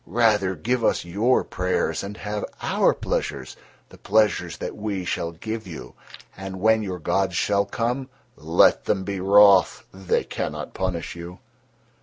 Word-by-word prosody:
Rather 105 -2 +2
give 120 +8 -1
us - - +1
your 105 +9 +2
prayers 90 0 -1
and 100 +1 -7
have 105 0 -4 0.2
our - - +3
pleasures, - - -3 0.3
the - - -15
pleasures 105 -1 +1
that - - -5
we 100 -3 -4
shall 85 -1 -2
give 110 +5 -6
you, 80 -4 -9 0.4
and 95 0 -7
when 110 +2 +3
your 95 -3 -4
gods 95 +2 0
shall 100 +2 +1
come, 125 +5 -2 0.3
let 80 +3 +3
them 95 -2 0
be 100 0 -4
wroth—they 95 -1 +4
cannot - - -5
punish 90 -3 -3
you." 85 +1 -9
100 Hz, 145 wpm, -24 LUFS, 90-110 Hz, 0.4 s, wroth—they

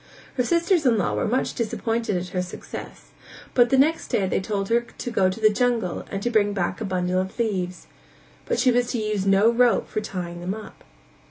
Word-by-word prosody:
Her 250 - 0
sisters 340 +4 +2
in 230 -3 +4
law 200 - 0
were - - 0
much 250 +4 0
disappointed 225 -2 -1
at 180 +1 -4
her 180 - -1
success, 180 - -8 0.4
but 245 -1 +5
the 265 - +3
next 310 +5 +2
day 195 - +1
they 190 - 0
told 195 0 -2
her 235 +1 +3
to 240 +1 -7
go 190 -4 +3
to 185 - -5
the 215 -1 +5
jungle 230 -6 0
and 200 +5 -2
bring 205 -2 +3
back 190 +2 -2
a - - -1
bundle 185 -1 0
of 190 0 -7
leaves, 185 -6 -2 0.6
but - - 0
she 250 +1 +4
was 245 0 +2
to - - 0
use 210 -2 -1
no 195 +4 +5
rope 240 0 +3
for 215 - -3
tying 175 -4 -5
them 185 +3 -3
up. 220 - -11
215 Hz, 210 wpm, -24 LUFS, 190-240 Hz, 0.6 s, but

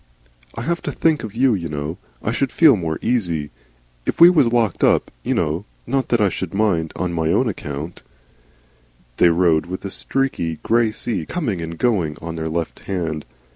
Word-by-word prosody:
I - - -4
have 170 +5 -1
to - - -3
think 160 -2 +1
of 110 -1 -7
you, 130 0 +4
you 85 -5 -3
know. 75 +4 -4 0.2
I 105 - 0
should 130 +1 0
feel 155 -6 +6
more 80 -5 -2
easy. 85 -11 0 0.6
If - - -1
we 170 +1 +10
was 145 -9 +3
locked 115 -6 +1
up, - - +3
you - - -1
know 80 +6 -1 0.2
Not 135 +2 -1
that 120 - +2
I 105 - +4
should 95 0 -4
mind 90 -7 +1
on 90 -1 -2
my 80 -1 0
own 120 +7 +2
account 75 -4 -5 0.6
" - - -35
They 85 - +6
rode 85 -2 +3
with 95 +2 -6
a 100 - -4
streaky, 115 -14 -1
grey 115 -1 +2
sea 105 -6 -3
coming 115 - -2
and 80 0 -6
going 90 -11 +1
on 85 0 -6
their 80 0 -3
left 80 0 -3
hand. 80 -5 -3
90 Hz, 195 wpm, -21 LUFS, 80-115 Hz, 0.6 s, we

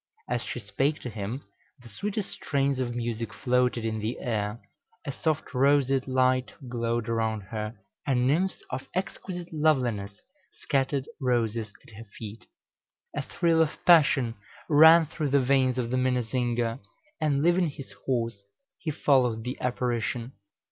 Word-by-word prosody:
As - - -1
she - - -5
spake 145 +3 0
to 125 - -5
him, 110 +6 -5 0.4
the - - -12
sweetest 200 - -4
strains 140 -2 0
of 120 -2 -2
music 115 -2 -3
floated 125 0 +1
in 110 -1 -1
the 110 +3 -3
air, 110 -3 -2 0.5
a 140 - -2
soft 155 +1 -2
roseate 135 0 +3
light 130 0 +2
glowed 120 -1 -1
around 110 -2 0
her, 105 +2 -5 0.3
and 125 -3 +2
nymphs 170 +8 +1
of 130 +1 -5
exquisite 180 -2 -4
loveliness 125 -10 +1 0.4
scattered 135 -1 0
roses 115 -4 0
at 115 - -17
her 115 +2 -10
feet. 110 0 -9 0.7
A - - 0
thrill 165 -1 +2
of 155 -2 +1
passion 145 -8 +5 0.3
ran 160 +2 +8
through 150 -1 -3
the 140 +1 +4
veins 130 -1 +2
of 120 -2 -1
the 130 - +1
minnesinger; 120 -2 0 0.4
and, 145 -2 +2
leaving 175 0 +3
his 140 -1 -9 0.2
horse, 115 -5 -1 0.4
he 165 - -3
followed 130 -6 +2
the 125 +3 -3
apparition. 120 -1 -1
125 Hz, 145 wpm, -27 LUFS, 115-140 Hz, 0.7 s, ran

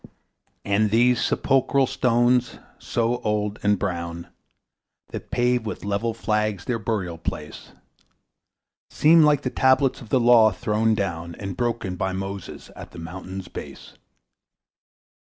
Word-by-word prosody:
And 105 +1 +2
these 120 +3 +3
sepulchral 135 0 +2
stones, 120 0 +1 0.2
so 120 +1 -1
old 105 -2 -2
and 105 0 +2
brown, 85 -3 -4 0.8
That - - -8
pave 125 -2 +1
with 105 - -6
level 100 +3 -1
flags 105 -4 -1
their 120 -2 -1
burial 100 -6 -3
place, 75 -2 -6 1.2
Seem 165 +2 +5
like 150 -2 +4
the 130 - -2
tablets 130 0 +2
of 115 - -12
the 130 - +3
Law, 120 -2 +6
thrown 105 +4 0
down 85 -4 -3
And 95 -2 -6
broken 115 -6 -2
by 95 +1 -2
Moses 95 0 -6
at - - -11
the - - -11
mountain's 95 +3 -7
base. - - -10
110 Hz, 130 wpm, -23 LUFS, 95-120 Hz, 1.2 s, Law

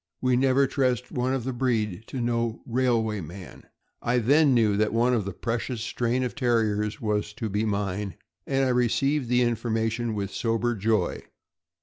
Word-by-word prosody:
We 130 -1 +2
never 135 +2 +3
trust 125 -2 0
one 125 +1 0
of 130 - -3
the 130 +1 -3
breed 110 -5 -1
to 130 - -5
no 115 -1 -1
railway 115 -4 +1
man." 90 +2 -10 0.4
I 120 +1 +1
then 140 +4 +4
knew 110 -4 +3
that 110 +1 +1
one 120 +2 +3
of 110 -5 0
a - - -2
precious 115 +3 -3
strain 120 +2 -1
of 125 - -2
Terriers 110 -5 0
was 105 -1 -1
to 110 0 -4
be 105 +2 0
mine, 100 -2 -2 0.3
and 135 -1 +1
I - - +1
received 125 +2 +1
the 125 0 +3
information 115 -1 -1
with 100 -2 -3
sober 115 +1 0
joy. 105 -3 0
115 Hz, 175 wpm, -26 LUFS, 105-125 Hz, 0.4 s, then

